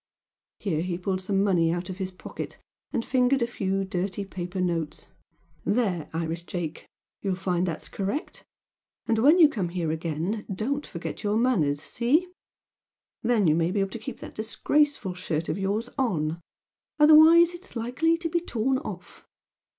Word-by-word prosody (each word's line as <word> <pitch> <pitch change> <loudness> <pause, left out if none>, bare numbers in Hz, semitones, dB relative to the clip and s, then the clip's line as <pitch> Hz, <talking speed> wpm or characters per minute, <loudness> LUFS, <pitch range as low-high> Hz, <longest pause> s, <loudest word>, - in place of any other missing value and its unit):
Here 160 -6 -1
he 175 0 -2
pulled 185 +1 -2
some 195 +1 +1
money 175 -5 +3
out 175 +1 -2
of 185 -2 -6
his 190 -1 -3
pocket, 185 - -8 0.3
and 230 - -1
fingered 255 0 +3
a - - +3
few 195 -4 -1
dirty 190 +1 -3
paper 185 -1 -5
notes 170 -4 -2 0.6
"There, 200 -8 0
Irish 165 +1 -3
Jake! 170 -3 -5 0.3
You'll 195 -2 0
find 180 -1 0
that's 165 -2 -3
correct. 200 +10 -4 0.6
And 225 - +1
when 295 +9 +6
you 330 -4 +9
come 205 - -2
here 170 -3 -2
again 165 +6 -2
don't 270 +10 -2
forget 170 - -6
your 210 +1 +1
manners! 155 - +2
See? 280 - +1 0.9
Then 225 -4 +2
you 155 - +5
may 165 +1 +2
be 200 +3 0
able 195 -1 0
to 230 - -5
keep 220 - -7
that - - -8
disgraceful 225 0 +1
shirt 170 -3 -3
of - - -1
yours 205 +4 -1
on! 170 - 0 0.6
Otherwise 315 +3 +8
it's 350 -3 -11
likely 255 +9 +1
to 335 0 -3
be 340 +1 +1
torn 260 -4 0
off! 300 - -9
195 Hz, 165 wpm, -26 LUFS, 175-250 Hz, 0.9 s, you